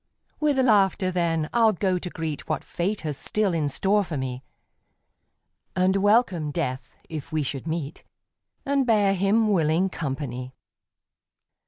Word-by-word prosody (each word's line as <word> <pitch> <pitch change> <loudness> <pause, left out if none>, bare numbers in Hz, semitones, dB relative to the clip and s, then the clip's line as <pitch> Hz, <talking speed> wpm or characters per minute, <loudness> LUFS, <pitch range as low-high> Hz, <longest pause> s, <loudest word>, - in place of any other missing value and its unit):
With 295 -2 +2
laughter, 205 -6 +3
then, 165 -3 0
I'll 225 -2 +4
go 185 -1 0
to 180 - -5
greet 160 -3 -5
What 155 - -1
Fate 195 +5 -2
has 150 -3 -4
still 205 +5 0
in 155 -3 0
store 200 +9 +2
for 165 -5 -5
me, 130 0 -4 1.3
And 185 +1 +3
welcome 200 -6 +2
Death 130 -4 -3 0.2
if 155 -3 -7
we 155 -1 0
should 135 +2 -4
meet, 160 -3 -4 0.6
And 275 -2 +1
bear 205 -4 +4
him 200 +4 +2
willing 170 +1 +2
company. 130 -5 -5
175 Hz, 140 wpm, -25 LUFS, 150-205 Hz, 1.3 s, I'll